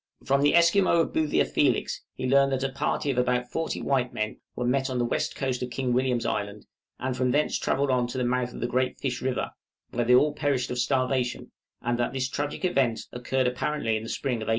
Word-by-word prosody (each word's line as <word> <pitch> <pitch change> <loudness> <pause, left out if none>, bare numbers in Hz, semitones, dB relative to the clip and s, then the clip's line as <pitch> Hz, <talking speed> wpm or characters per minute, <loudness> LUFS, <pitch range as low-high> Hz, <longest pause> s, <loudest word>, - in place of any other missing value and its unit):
From 140 +1 +2
the 145 +3 +4
Esquimaux 170 +1 +5
of - - -2
Boothia 155 -2 +2
Felix - - +1
he - - -4
learned 140 +1 +4
that 130 0 -1
a 135 - -1
party 140 +1 -1
of 125 - 0
about 125 0 0
forty 165 0 -2
white 130 -2 +1
men 110 0 -3 0.2
were 125 - -2
met 130 +2 +1
on 130 - -2
the 120 - +1
west - - -1
coast 130 -2 -2
of 125 - -3
King 125 0 -1
William's 125 -1 +1
Island, 105 0 -3 0.3
and 130 0 -2
from 125 0 +1
thence 150 +4 +1
travelled 140 0 +1
on 125 -1 +2
to 125 - -6
the 125 - 0
mouth 125 0 0
of - - -9
the 120 - 0
Great 130 +1 0
Fish 125 -3 -3
River, 130 -1 -1 0.4
where 120 - 0
they 125 +1 +5
all 150 +3 +4
perished 135 -4 0
of 125 - -2
starvation, 130 -1 0 0.3
and 120 0 0
that 120 - 0
this 130 -1 -1
tragic 145 +6 -3
event 135 -10 +1
occurred 130 +2 -1
apparently 125 -2 0
in 110 - -2
the 115 - -7
spring 130 -4 -1
of 110 -1 -6
1850. - - -2
130 Hz, 235 wpm, -27 LUFS, 125-140 Hz, 0.4 s, Esquimaux